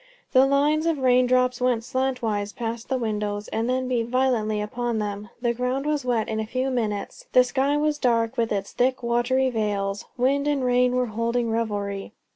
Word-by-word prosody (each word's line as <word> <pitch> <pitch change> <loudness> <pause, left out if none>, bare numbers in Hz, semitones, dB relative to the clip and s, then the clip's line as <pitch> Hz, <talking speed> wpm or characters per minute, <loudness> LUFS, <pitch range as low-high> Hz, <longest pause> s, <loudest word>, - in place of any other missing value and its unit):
The 260 0 +5
lines 295 +3 +2
of 330 -2 +1
rain 255 -1 +3
drops 250 0 +2
went 245 -2 +1
slantwise 245 -5 -2
past 230 -1 -5
the 265 - +1
windows, 210 -3 -2
and 225 +2 -1
then 255 0 0
beat 240 -3 0
violently 240 -4 +1
upon 235 +2 -2
them; 205 -1 -4
the 240 -1 0
ground 250 +3 -2
was 300 -2 0
wet 240 -3 0
in 220 0 -2
a 220 - -3
few 255 +3 -1
minutes; 215 -5 -3
the 255 - +7
sky 275 +3 +1
was 300 0 0
dark 230 -2 +1
with 230 -2 0
its 200 -1 -2
thick 255 +1 0
watery 245 +2 +1
veils. 205 -3 -2
Wind 275 +3 +1
and 285 -3 +1
rain 250 0 +3
were 250 0 +2
holding 230 +1 -1
revelry. 205 -3 -3
245 Hz, 190 wpm, -24 LUFS, 220-260 Hz, -, the